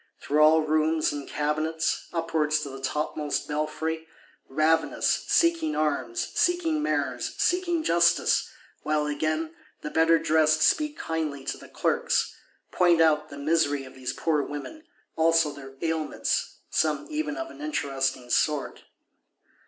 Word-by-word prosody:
Through 150 +2 +1
all 155 +1 +6
rooms 155 +1 +1
and 145 -1 -6
cabinets, 155 +2 -1
upwards 160 -2 0
to 145 - -5
the 135 0 -9
topmost 150 +2 -2
belfry: 160 +2 -3 0.4
ravenous; 155 +3 +1
seeking 335 -2 +2
arms, 135 -6 -1
seeking 335 -3 +1
Mayors, 305 - -1
seeking 345 -2 +1
justice;—while, 165 - +1
again, 155 +2 -2 0.3
the 150 - -5
better 165 +1 +4
cressed - - -6
(dressed?) 155 0 +3
speak 300 -1 +2
kindly 155 -4 -3
to - - -2
the - - -13
Clerks; - - 0 0.4
point 175 -2 +4
out 155 -1 +3
the 145 - -9
misery 145 -2 +1
of 130 - -12
these 130 -1 -4
poor 155 -3 0
women; 145 - -7 0.3
also 165 -1 +3
their 135 -1 -11
ailments, 160 -1 -2
some 150 -2 +1
even 310 +1 -2
of 330 0 -5
an - - -13
interesting 135 - -2
sort. 150 -2 0
155 Hz, 135 wpm, -26 LUFS, 150-165 Hz, 0.4 s, all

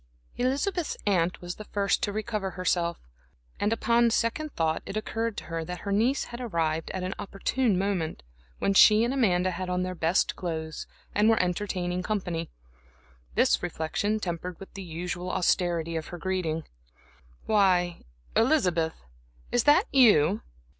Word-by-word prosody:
Elizabeth's 285 +8 -1
aunt 180 -3 +1
was 175 0 -6
the 215 - -7
first 200 -1 0
to 215 -4 0
recover 215 -2 -2
herself, 175 -2 0 0.6
and 205 - +1
upon 235 +1 +3
second 230 +7 0
thought 160 -1 0
it 195 - -4
occurred 225 +1 -2
to - - -4
her 165 -1 -4
that 180 +1 -6
her 200 - -4
niece 235 +8 +2
had 240 +1 -8
arrived 165 -8 -1
at 185 - -4
an 185 +1 -2
opportune 205 +2 0
moment 185 - -1 0.3
when 200 - +1
she 215 +3 +7
and 240 +3 0
Amanda 185 -8 +2
had 185 +1 -4
on 180 0 0
their 185 0 -3
best 170 +1 +1
clothes, 160 -3 -4 0.3
and 210 +2 +4
were 225 - +4
entertaining 180 -1 -1
company. 180 -5 -2 0.9
This - - +3
reflection 205 +7 -1
tempered 175 -2 -4 0.2
the 195 - -7
usual 175 +1 -4
austerity 170 -2 +1
of 160 -1 -3
her 175 - -7
greeting. 170 -3 -2 0.8
"Why, 185 -5 +2 0.3
Elizabeth, 180 - +2 0.6
is 245 - +2
that 300 +8 +6
you? 210 - +5
185 Hz, 150 wpm, -27 LUFS, 170-215 Hz, 0.9 s, she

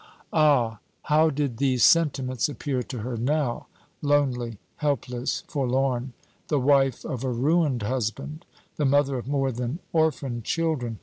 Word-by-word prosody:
Ah, 135 -9 +3 0.2
how 155 +1 +4
did 140 -5 -2
these 130 -3 +2
sentiments 135 - +3
appear 140 -3 -2
to 125 -1 -6
her 120 +1 -4
now 130 +1 -1 0.3
lonely, 130 -6 +1 0.2
helpless, 135 -4 -2
forlorn 130 -2 -1 0.3
the 150 - +1
wife 135 -1 +2
of 130 -5 -4
a 130 - 0
ruined 135 0 +1
husband, 130 +7 -3 0.3
the 150 - +1
mother 140 -1 +2
of 120 - -9
more 135 -1 0
than 125 +4 -3 0.2
orphan 150 -7 0
children! 135 -5 -1
135 Hz, 135 wpm, -25 LUFS, 125-145 Hz, 0.3 s, how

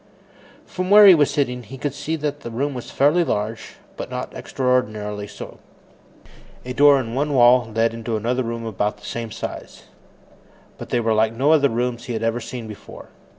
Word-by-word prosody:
From 185 0 -4
where 210 +1 +9
he 195 - +10
was 150 -4 +3
sitting, 125 -4 -1
he 125 +4 -11
could 140 +1 -3
see 155 +2 -3
that 150 -2 -3
the 120 - -8
room 135 +5 -2
was 125 -2 -7
fairly 150 +6 +3
large, 110 -5 -3 0.2
but - - -6
not - - -5
extraordinarily 110 -5 -2
so. - - -10 1.1
A 125 - -4
door 145 0 +6
in 115 -3 -5
one 145 +2 -1
wall 120 -2 +5
led 115 +1 +1
into 115 -1 -3
another 120 +4 -1
room 115 -1 -4
of 110 - -5
about 105 +2 -1
the 105 - -15
same 115 -1 -5
size. - - -8 1.0
But - - -8
they 120 - +1
were 115 -1 +1
like 110 +1 +2
no 135 +6 +2
other 145 -3 +4
rooms 120 +1 -2
he 125 - -4
had 110 - -3
ever 115 +1 0
seen 120 -1 -7
before. 105 -2 -11
120 Hz, 195 wpm, -21 LUFS, 115-140 Hz, 1.1 s, he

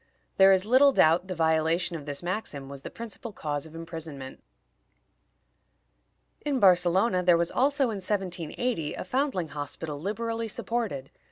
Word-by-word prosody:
There 195 0 +7
is 190 0 +3
little 260 +5 +6
doubt 170 -5 +4
the 185 - -4
violation 160 +1 +1
of 150 -3 -8
this 145 +3 -4
maxim 175 -7 -4
was 140 -1 -8
the - - -7
principal 230 0 -7
cause 150 -4 -4
of 160 - -14
imprisonment. 160 -5 -7 2.0
In 285 -3 0
Barcelona 185 +1 +4
there 175 -1 +5
was 170 0 0
also, 280 +2 +2
in 210 - -4
1780, 185 -1 -2
a - - -5
foundling 250 - -1
hospital 145 +1 -5
liberally 225 +5 -3
supported. 215 - -3
180 Hz, 145 wpm, -27 LUFS, 160-225 Hz, 2.0 s, There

